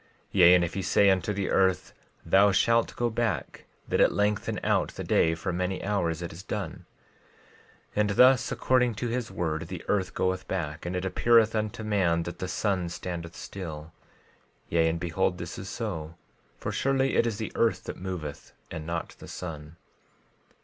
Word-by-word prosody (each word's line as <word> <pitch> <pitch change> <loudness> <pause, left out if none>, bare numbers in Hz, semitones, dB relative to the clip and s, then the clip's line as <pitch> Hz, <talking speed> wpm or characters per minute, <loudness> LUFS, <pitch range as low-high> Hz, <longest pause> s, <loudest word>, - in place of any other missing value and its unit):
12:14 - - -32 0.2
Yea, 90 -2 +7
if 85 -2 +1
he 100 - -2
say 100 +2 +4
unto 95 +2 0
the 100 -1 -2
earth—Thou 95 +1 +2
shalt 115 +4 +2
go 120 - +1
back, 110 - -2 0.2
that - - +1
it - - +5
lengthen 105 0 0
out - - +2
the - - -5
day 80 0 +3
for 90 +3 -3
many 90 +1 -2
hours—it 85 -5 -1
is 85 - -9
done; 95 -3 -5 1.1
12:15 - - -12
And 105 0 +3
thus, 125 +4 +5
according 125 -3 +2
to 120 +3 -3
his 120 0 -2
word 80 -1 -2
the 90 -1 -7
earth 95 -4 0
goeth 95 0 -1
back, 85 -3 -3
and 90 - -3
it 90 +1 -2
appeareth 115 +3 +4
unto 110 0 -2
man 90 -6 +1
that 85 +1 -7
the 95 - -3
sun 95 -1 -1
standeth 85 -1 -6
still; 80 -5 -7 0.8
yea, 80 -1 +3
and 85 +1 -2
behold, 90 +2 0
this 85 -1 -6
is 95 0 -7
so; 85 -8 -4 0.4
for - - -4
surely 135 0 +1
it 120 - +3
is 110 -3 -2
the 110 - -4
earth 115 -1 +1
that - - -6
moveth 90 -6 -6 0.2
and 80 -2 -6
not 85 0 -3
the - - -10
sun. 80 -2 -7
95 Hz, 175 wpm, -28 LUFS, 85-105 Hz, 1.1 s, Yea